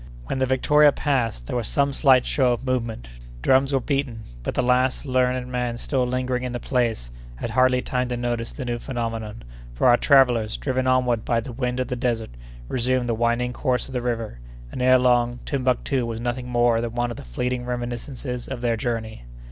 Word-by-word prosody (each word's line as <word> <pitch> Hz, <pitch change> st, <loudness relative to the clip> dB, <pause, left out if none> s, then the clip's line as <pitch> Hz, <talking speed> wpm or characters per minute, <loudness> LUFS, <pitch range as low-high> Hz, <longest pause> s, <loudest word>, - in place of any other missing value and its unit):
When 130 Hz, -, -3 dB
the 130 Hz, -, +2 dB
Victoria 150 Hz, +3 st, +5 dB
passed, 120 Hz, -, -1 dB
there -, -, -4 dB
was 120 Hz, -3 st, -1 dB
some 140 Hz, 0 st, +1 dB
slight 135 Hz, -3 st, +4 dB
show 130 Hz, -3 st, +2 dB
of 120 Hz, +2 st, -5 dB
movement; 115 Hz, -, -2 dB, 0.4 s
drums 135 Hz, +1 st, +4 dB
were 135 Hz, -, +2 dB
beaten; 130 Hz, -4 st, -2 dB, 0.2 s
but -, -, -4 dB
the -, -, +1 dB
last 125 Hz, +2 st, +2 dB
learned 125 Hz, -1 st, +1 dB
man 125 Hz, -1 st, -2 dB
still 125 Hz, 0 st, -1 dB
lingering 125 Hz, 0 st, -1 dB
in 125 Hz, -1 st, -4 dB
the 120 Hz, -, -3 dB
place 115 Hz, -, -1 dB, 0.2 s
had 115 Hz, -, -5 dB
hardly 130 Hz, +1 st, +3 dB
time 125 Hz, 0 st, -1 dB
to 125 Hz, 0 st, -3 dB
notice 120 Hz, -1 st, -2 dB
the 130 Hz, -, -6 dB
new 120 Hz, -1 st, -2 dB
phenomenon, 115 Hz, -, -4 dB, 0.3 s
for -, -, 0 dB
our 120 Hz, -1 st, +6 dB
travellers, 120 Hz, -7 st, +4 dB
driven 130 Hz, -1 st, -1 dB
onward 125 Hz, -3 st, +2 dB
by 115 Hz, -, +1 dB
the 120 Hz, +2 st, -7 dB
wind 125 Hz, 0 st, -2 dB
of 130 Hz, -, -1 dB
the 125 Hz, -, -2 dB
desert, 120 Hz, -2 st, -2 dB, 0.4 s
resumed 125 Hz, 0 st, 0 dB
the 120 Hz, -, +1 dB
winding 120 Hz, +2 st, 0 dB
course 125 Hz, -1 st, -1 dB
of 130 Hz, -, -10 dB
the 125 Hz, -, -1 dB
river, 115 Hz, -, -3 dB, 0.3 s
and, -, -, -5 dB
ere 130 Hz, 0 st, +6 dB
long, 120 Hz, -1 st, +2 dB
Timbuctoo 130 Hz, 0 st, 0 dB
was 115 Hz, -1 st, -4 dB
nothing 125 Hz, +1 st, -3 dB
more 120 Hz, -1 st, +3 dB
than 120 Hz, 0 st, -4 dB
one 120 Hz, 0 st, 0 dB
of 120 Hz, -, -7 dB
the -, -, -8 dB
fleeting 125 Hz, -, -3 dB
reminiscences 125 Hz, +1 st, -4 dB
of 130 Hz, -3 st, -5 dB
their 120 Hz, -2 st, +1 dB
journey. 110 Hz, -, -4 dB
125 Hz, 205 wpm, -23 LUFS, 120-130 Hz, 0.4 s, our